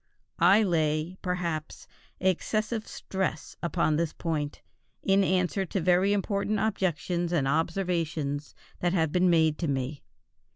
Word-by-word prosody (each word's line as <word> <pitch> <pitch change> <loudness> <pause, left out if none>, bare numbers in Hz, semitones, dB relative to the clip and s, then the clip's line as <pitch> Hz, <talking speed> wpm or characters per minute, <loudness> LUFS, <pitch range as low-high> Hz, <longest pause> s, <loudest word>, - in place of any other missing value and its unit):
I 195 +6 +6
lay, 160 -1 0
perhaps, 170 -4 -3 0.3
excessive 215 +4 0
stress 190 -5 -3
upon 170 -3 +1
this 165 -1 -1
point, 150 -3 -3 0.4
in 195 0 +4
answer 185 +1 +1
to 195 - -1
very 180 +3 +3
important 205 +1 0
objections 175 -4 -1
and 150 -6 +1
observations 160 -2 -1 0.2
that 175 0 +1
have 160 -4 +1
been 180 +2 +3
made 160 -3 +3
to 170 - -1
me. 135 +1 -2
175 Hz, 125 wpm, -28 LUFS, 155-190 Hz, 0.4 s, I